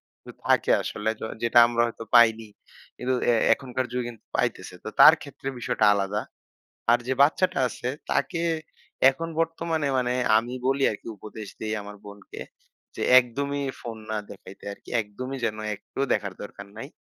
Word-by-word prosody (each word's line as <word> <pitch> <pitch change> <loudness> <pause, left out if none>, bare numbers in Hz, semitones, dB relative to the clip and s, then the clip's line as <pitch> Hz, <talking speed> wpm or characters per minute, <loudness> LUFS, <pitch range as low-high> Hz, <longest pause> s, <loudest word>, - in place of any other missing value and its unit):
কিছু - - -13 0.2
থাকে - - +3
আসলে। 110 +1 -3
য - - -8 0.2
যেটা 120 +1 +5
আমরা 120 0 0
হয়তো 115 0 -7
পাইনি, 115 -1 +5 0.5
কিন্তু 130 +1 -1 0.2
এ - - +3 0.2
এখনকার 130 0 -4
যুগে 125 -1 -2
কিন্তু 115 -2 -14
পাইতেছে। - - -2
তো - - -5
তার - - +11
ক্ষেত্রে - - -9
বিষয়টা 110 - +1
আলাদা। 100 +1 -1 0.7
আর 120 - +6
যে 130 - +1
বাচ্চাটা 155 +3 +3
আছে 120 +1 -6 0.2
তাকে 175 -2 0 0.7
এখন 165 +5 -4
বর্তমানে 165 -2 -1
মানে 125 -1 0 0.2
আমি 120 +3 -2
বলি 135 +1 +1
আরকি 105 - -9
উপদেশ 105 +1 -9
দেই 110 0 -2
আমার 105 0 -9
বোনকে, 100 0 -11 0.5
যে - - -6 0.2
একদমই 140 +4 -3 0.2
ফোন 115 -2 -6
না 110 - -1
দেখাইতে 95 -1 -13
আরকি। - - -12
একদমই 130 +6 -7
যেন 110 -1 -2 0.2
একটুও 135 +6 -4
দেখার 100 -2 -2
দরকার 100 -1 -10
নাই। 135 - -6
120 Hz, 160 wpm, -25 LUFS, 110-135 Hz, 0.7 s, তার